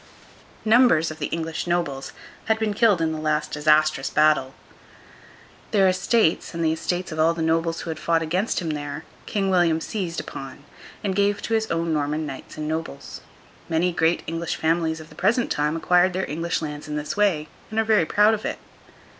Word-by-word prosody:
Numbers 215 -9 +5
of 155 - -9
the - - -1
English 165 0 -3
nobles 155 -6 -1 0.3
had 220 0 +2
been 220 -2 -1
killed 205 -5 +3
in 160 - +1
the 155 - -4
last 155 0 -1
disastrous 150 -2 +2
battle. 150 -3 +2 1.1
Their 195 -3 +4
estates, 185 -1 +1
and 165 -1 -1
the 160 - +3
estates 175 +2 -3
of 155 - -5
all 165 +1 +3
the 165 - -2
nobles 165 +1 0
who 165 - -4
had 160 - -6
fought 165 -1 +1
against 180 +5 -1
him 160 - -2
there, 145 0 -5 0.2
King 195 -2 0
William 175 -3 +3
seized 180 -2 -4
upon, 135 +1 -8 0.4
and 195 -2 -1
gave 200 0 +2
to 230 - -2
his 220 0 +1
own 165 0 0
Norman 150 +1 -1
knights 135 0 -8
and 155 0 -4
nobles. 160 -3 -5 0.5
Many 170 +2 +1
great 165 0 +1
English 165 0 -3
families 160 0 0
of 155 0 -12
the - - -14
present 240 +2 +1
time 150 +1 0
acquired 180 +2 +3
their 190 +1 -2
English 165 +2 -2
lands 150 -1 -6
in 150 - -4
this 150 0 -3
way, 190 -7 +2 0.2
and 220 - -1
are - - +4
very 215 -7 +3
proud 210 +2 +4
of 215 - -3
it. - - -3
165 Hz, 195 wpm, -24 LUFS, 155-185 Hz, 1.1 s, Numbers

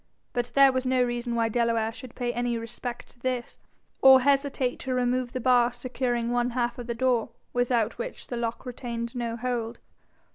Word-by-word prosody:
But 245 0 -2
there 275 -1 +7
was 260 0 -1
no 255 -1 +2
reason 240 -1 -2
why 230 -1 +2
Delaware 230 -1 +1
should 250 +1 -11
pay 240 -1 -2
any 240 -1 -1
respect 240 +1 -6
to - - -22
this, 250 -1 -3 0.4
or 265 -1 +9
hesitate 275 -2 +1
to 260 -1 -2
remove 250 0 0
the 255 - -3
bar 245 -1 +4
securing 245 -1 -2
one 245 0 +1
half 240 0 0
of 240 - -6
the 235 - -2
door, 245 -1 +1 0.2
without 240 -2 +1
which - - -5
the 245 - -5
lock 235 +1 -3
retained 235 -2 -5
no 235 -1 -2
hold. 235 -1 -2
245 Hz, 185 wpm, -27 LUFS, 235-255 Hz, 0.4 s, or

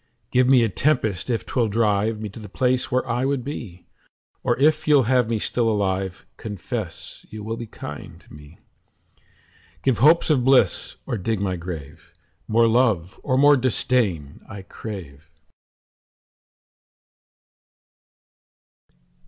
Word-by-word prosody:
Give 125 0 +3
me 130 -3 +6
a - - +3
tempest 110 - 0
if 115 -2 -1
'twill 120 -3 0
drive 105 0 +1
Me 110 - -4
to 105 - -11
the 105 -2 -10
place 125 +4 0
where 130 +1 0
I 120 +1 -1
would 135 -2 0
be; 110 -10 -7 0.6
Or - - 0
if 155 +3 +2
you'll 145 -3 +5
have 125 -1 +2
me 115 - 0
still 115 +2 0
alive, 95 -3 -2
Confess 105 -2 -6
you 110 -1 -8
will 110 +2 -3
be 115 0 -7
kind 75 -7 -9
to - - -18
me. 75 +2 -14 0.6
10 - - -35 0.6
Give 130 -4 +2
hopes 155 +5 +5
of 130 -5 +2
bliss 130 -7 +3
or 115 - -3
dig 110 +2 -1
my 95 -2 -1
grave: 85 -5 -9 0.3
More 115 +1 +4
love 110 -6 +1
or 130 -2 0
more 145 +2 +6
disdain 115 - 0
I 100 -3 -8
crave. 80 -8 -9
115 Hz, 140 wpm, -23 LUFS, 95-125 Hz, 0.6 s, me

